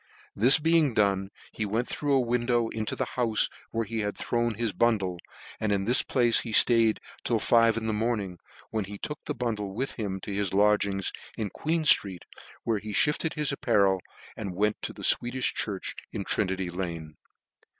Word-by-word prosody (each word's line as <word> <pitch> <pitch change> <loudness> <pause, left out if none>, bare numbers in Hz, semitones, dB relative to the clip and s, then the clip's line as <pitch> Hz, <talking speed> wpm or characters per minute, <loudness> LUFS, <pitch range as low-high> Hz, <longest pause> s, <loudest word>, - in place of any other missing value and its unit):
This 125 +7 +7
being 160 -5 +2
done, 100 -2 +1 0.2
he 110 - -4
went 110 +4 -1
through 145 -1 -2
a 135 - +4
window 120 -1 0
into 110 -1 -3
the - - -2
houfe 115 -4 0 0.2
where 115 0 -2
he 115 +2 -4
had 105 -1 -3
thrown 120 -1 -1
his 115 -1 -2
bundle; 100 -7 0 0.4
and 110 -1 -1
in 100 -1 0
this 120 +5 +4
place 120 -3 +3
he 120 - -5
ftaid 115 -1 +6 0.3
till - - +1
five 115 -1 +3
in 115 - -3
the 110 - -1
morning, 105 -5 -2 0.3
when 110 -3 -2
he 100 +1 -8
took 150 +8 -6
the - - -3
bundle 105 -5 -3
with 130 +1 -4
him 95 -3 -3
to 100 - -6
his 100 -1 -1
lodgings 100 -1 +2 0.3
in 105 -4 -3
Queen 160 +7 -1
ftreet, 95 - +3 0.4
where 110 -3 0
he 105 0 -7
fhifted 150 +6 +1
his 150 -1 0
apparel, 100 -8 +1 0.3
and 95 -5 -6
vent 105 0 0
to - - -4
the - - -11
Sweedifh 125 +2 +2
church 100 -3 -3 0.2
in - - -4
Trinity 95 -1 -1
Lane. 85 -4 -6
110 Hz, 185 wpm, -27 LUFS, 100-120 Hz, 0.4 s, This